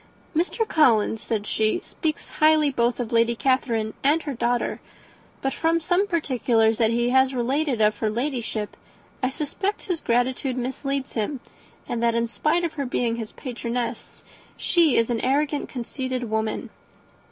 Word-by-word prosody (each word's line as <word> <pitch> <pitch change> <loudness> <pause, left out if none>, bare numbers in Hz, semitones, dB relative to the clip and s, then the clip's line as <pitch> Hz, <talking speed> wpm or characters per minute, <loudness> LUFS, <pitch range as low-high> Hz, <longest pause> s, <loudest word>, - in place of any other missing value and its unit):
"Mr. 370 +7 0
Collins," 225 - +3
said 215 -3 -2
she, 215 0 +1
"speaks 310 -2 -3
highly 310 -1 +4
both 240 -1 +1
of 235 -2 -3
Lady 230 0 +3
Catherine 230 -4 +1
and 300 +4 +3
her 285 - -3
daughter; 240 0 0 0.6
but, 270 0 0
from 330 +1 +1
some 355 +5 +1
particulars 245 - +2
that 225 -2 +4
he 240 +1 +1
has 265 0 +4
related 260 0 0
of 210 0 +3
her 220 - +1
Ladyship, 235 -3 -3 0.5
I 255 - +1
suspect 315 +9 -3
his 355 -4 -3
gratitude 250 +2 0
misleads 270 +2 -3
him; 245 +5 -2 0.5
and 235 - -2
that, 235 -1 +2
in 235 0 +2
spite 305 +8 0
of 335 - -1
her 280 -3 -3
being 235 -2 0
his 225 -2 -5
patroness, 240 -1 -4 0.3
she 335 -5 +3
is 230 +1 +2
an 230 - 0
arrogant, 285 +2 0
conceited 255 -1 -4
woman." 220 0 -2
250 Hz, 155 wpm, -24 LUFS, 230-295 Hz, 0.6 s, highly